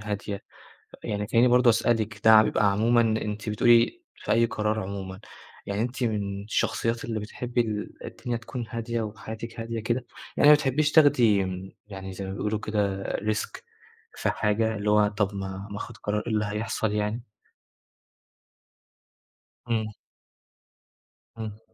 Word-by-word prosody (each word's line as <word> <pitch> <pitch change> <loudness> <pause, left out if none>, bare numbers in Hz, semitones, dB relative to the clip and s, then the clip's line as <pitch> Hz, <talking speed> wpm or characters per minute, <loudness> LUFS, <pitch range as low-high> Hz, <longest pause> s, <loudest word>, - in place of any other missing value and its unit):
هادية. 105 -1 -4 0.6
يعني 105 0 -2
تلاقيني 120 +2 +4
برضه 125 0 +6
أسألِك 110 -1 +1
ده 110 -1 +9
بيبقى 105 -1 +2
عمومًا 115 +4 +3
أنتِ 110 -1 -1
بتقولي 120 - +4
في - - -2
أي 115 +1 +4
قرار 110 0 -1
عمومًا، 95 0 -6 0.5
يعني 100 +2 -1
أنتِ 125 +2 -3
مِن 100 -3 -2
الشخصيات 115 +2 -1
اللي 110 -2 -3
بتحبّي 120 +3 -3
ال 105 -2 -3
الدنيا 120 -1 -4
تكون 115 +1 -6
هادية 115 0 -2
وحياتِك 110 +2 -7
هادية 115 0 -3
كده، 120 +2 -1 0.3
يعني 145 - +5
ما 150 - +11
بتحبّيش 150 +1 +1
تاخدي 120 -10 +5
م 95 +1 -6
يعني 95 -2 -7
زي 95 +1 -6
ما 95 - -5
بيقولوا 105 +1 -1
كده 100 -2 -1
Risk 110 +1 -2 0.7
في - - 0
حاجة، 110 +1 0
اللي 105 +1 0
هو 105 0 +5
طَب 105 -1 -1
ما 95 +1 -5
ما 100 - -5
آخُد 115 +2 -7
قرار، 105 0 -2
إيه 115 - -2
اللي 105 0 +1
هيحصل 105 +1 -2
يعني؟ 105 +3 -1 2.5
إمم. 110 -2 0 1.5
إمم. 110 -1 -6
110 Hz, 145 wpm, -26 LUFS, 105-115 Hz, 2.5 s, ما